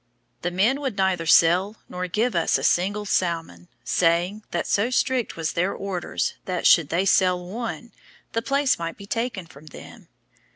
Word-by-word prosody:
The 175 - -1
men 215 +11 +1
would 260 -8 -3
neither 190 -3 0
sell 180 +6 +4
nor 180 0 -4
give 220 +6 0
us 170 - +2
a - - -6
single 200 +4 +1
salmon, 165 - -2 0.2
saying, 175 +4 +1
that - - -2
so 205 +4 +1
strict 255 -4 0
were 165 - -6
their 170 +4 0
orders 195 -3 -3
that, 180 -2 -3
should 165 -4 +5
they 180 +4 0
sell 180 -2 +2
one, 235 +4 -6 0.4
the 230 - -1
place 275 -1 +1
might 165 0 -5
be 200 - -10
taken 230 -3 -3
from 155 -1 -16
them. 145 - -13
185 Hz, 170 wpm, -24 LUFS, 170-220 Hz, 0.4 s, should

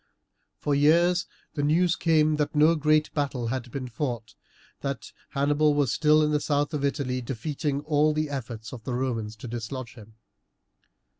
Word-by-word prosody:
For 145 - -1
years 170 +5 +4 0.3
the 145 - -2
news 165 +4 +3
came 155 -2 +3
that 150 +1 -1
no 155 +3 +6
great 155 -1 +2
battle 135 -6 -1
had 125 0 -3
been 130 +1 -5
fought, 120 -3 -4 0.5
that 140 -1 -4 0.2
Hannibal 145 +2 +2
was 145 -4 +2
still 155 0 +4
in 150 - +1
the 150 - +2
south 145 +1 0
of 145 -2 -2
Italy 135 -3 -1
defeating 140 +4 -3
all 150 0 +2
the 155 0 -1
efforts 120 -5 -6
of 120 -3 -8
the 125 - -3
Romans 115 -4 -2
to 110 - -9
dislodge 120 +1 -5
him. 110 -2 -15
145 Hz, 165 wpm, -26 LUFS, 125-150 Hz, 0.5 s, no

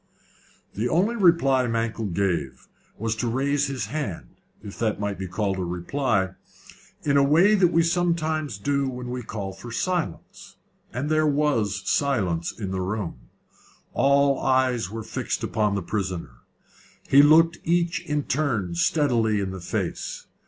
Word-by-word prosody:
The 115 +4 -1
only 195 - +2
reply 165 - +4
Mankell 115 -1 -1
gave 85 -8 -2 0.3
was 110 +1 -2
to 120 - -1
raise 140 +4 +1
his 130 -6 -3
hand 110 - -4 0.3
if 100 -2 -9
that 110 -3 0
might 100 -2 -3
be 95 - -4
called 95 +1 -2
a - - -1
reply 95 +3 -1 0.7
in 145 - +1
the - - +6
way 165 +9 +5
we 180 -4 +4
sometimes 160 - 0
do 140 +5 0
when 125 -1 -6
we 125 0 -3
call 100 -4 -5
for 95 +5 -10
silence, 175 - -3 0.4
and 130 +5 -3
there 155 0 +2
was 115 -10 0
silence 95 - 0
in 100 -4 -6
the 95 -1 -2
room. 95 - -4 0.6
All 140 0 +3
eyes 130 -6 +1
were 110 +2 -6
fixed - - -3
upon 105 -2 0
the 100 - -2
prisoner. 90 -8 -3 0.8
He 140 - +7
looked 165 +3 +5
each 170 0 +1
in 150 -3 -1
turn 120 - -1
steadily 115 - +2
in 95 -1 -2
the 95 -1 -7
face. 85 - -4
125 Hz, 150 wpm, -25 LUFS, 100-150 Hz, 0.8 s, He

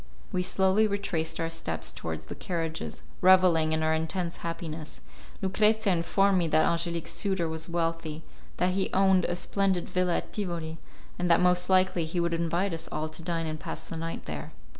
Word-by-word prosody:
We 180 - 0
slowly 190 +3 +3
retraced 195 -6 -2
our 165 0 -1
steps 85 - -3
towards 80 -1 -5
the - - -6
carriages, 165 -2 -4 0.2
revelling 180 -4 +6
in 160 0 +1
our 160 0 +3
intense 170 +2 -2
happiness. 165 -2 -5 0.4
Lucrezia 210 +1 +3
informed 190 +3 +3
me 170 - +1
that 155 0 +4
Angelique's 170 0 -1
suitor 190 -4 0
was 160 +1 -4
wealthy, 165 -2 -2 0.3
that 180 0 +2
he 190 0 0
owned 190 -2 +4
a 175 - -1
splendid 190 0 0
villa 180 -1 +1
at - - -6
Tivoli, 170 -5 -3 0.4
and 175 0 0
that 170 - +6
most 180 0 +3
likely 185 -2 +3
he 165 +3 -2
would 170 0 +1
invite 170 +3 0
us 165 - -5
all 155 +1 -2
to 155 +1 -9
dine 165 -1 -1
and 155 -1 -4
pass - - -6
the - - -6
night 165 +1 -4
there. 75 -2 -6
170 Hz, 180 wpm, -28 LUFS, 160-185 Hz, 0.4 s, revelling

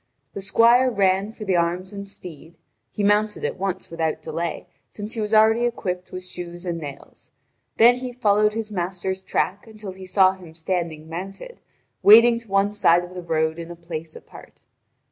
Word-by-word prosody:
The 200 - -6
squire 235 +6 +4
ran 195 -2 +1
for 220 -1 -9
the 190 -2 +1
arms 175 +3 -1
and 200 0 -7
steed; 165 -3 -12 0.3
he 205 - -4
mounted 210 +1 +1
at - - -3
once 190 -2 -3
without 160 -1 -1
delay, 165 0 -4 0.2
since 210 +2 -7
he 225 - -3
was 210 0 -3
already 220 +2 +5
equipped 185 -7 -3
with 185 0 -7
shoes 175 0 -8
and 170 -2 -3
nails. 140 -3 -10 0.5
Then 240 +2 +6
he 250 0 -5
followed 210 -3 +2
his 220 -1 -4
master's 190 0 -3
track 195 +2 -2
until 215 -3 -9
he 185 0 -11
saw 185 0 +5
him 180 -4 -13
standing 165 -2 -3
mounted, 195 - -8 0.4
waiting 230 +3 +7
to 230 - -19
one 195 +1 +1
side 175 -4 +4
of 175 +1 -10
the 180 - -6
road 160 -1 -1
in 170 0 -7
a 175 - -8
place 165 -2 -7
apart. - - -14
190 Hz, 185 wpm, -23 LUFS, 170-210 Hz, 0.5 s, waiting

